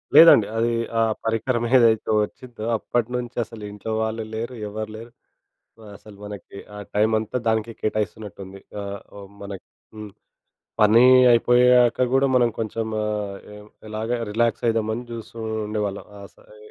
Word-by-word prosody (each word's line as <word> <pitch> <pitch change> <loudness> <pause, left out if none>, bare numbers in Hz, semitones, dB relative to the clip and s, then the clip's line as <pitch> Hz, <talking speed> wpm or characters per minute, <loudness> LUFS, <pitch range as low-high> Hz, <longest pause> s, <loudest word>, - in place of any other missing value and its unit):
లేదండి, 160 -10 +8
అది 120 +1 +1 0.3
ఆ - - +4 0.2
పరికరమేదైతే 115 0 +2
వచ్చిందో 120 0 -8
అప్పటినుంచి 120 +2 -3
అసలు 110 -1 -11
ఇంట్లో 105 +2 -6
వాళ్ళు 110 0 -2
లేరు, 115 +3 -4 0.2
ఎవర్లేరు 110 +2 -7 0.9
అసలు 105 0 -15
మనకి 100 -1 -10 0.2
ఆ - - -8 0.2
టైమంతా 110 +2 +1
దానికే 110 +1 0
కేటాయిస్తున్నటుంది. 100 -2 -4 0.2
ఆహ్, 100 0 -6
హ్మ్ 100 0 -12
మనకి 100 -2 -8 0.3
హ్మ్. 105 -1 -9 0.7
పని 110 +3 +6 0.3
అయిపోయాక 125 +1 +4
కూడా 135 +1 +4
మనం 120 -2 +4
కొంచెం 115 0 -3 1.0
ఇలాగా 110 +2 -3
ఏం - - -3
రిలాక్స్ 115 +1 0
అవుదామని 115 0 0
చూస్తుండేవాళ్ళం 110 -3 -4
ఆ - - -11
సరే 105 - -19
110 Hz, 120 wpm, -23 LUFS, 105-120 Hz, 1.0 s, లేదండి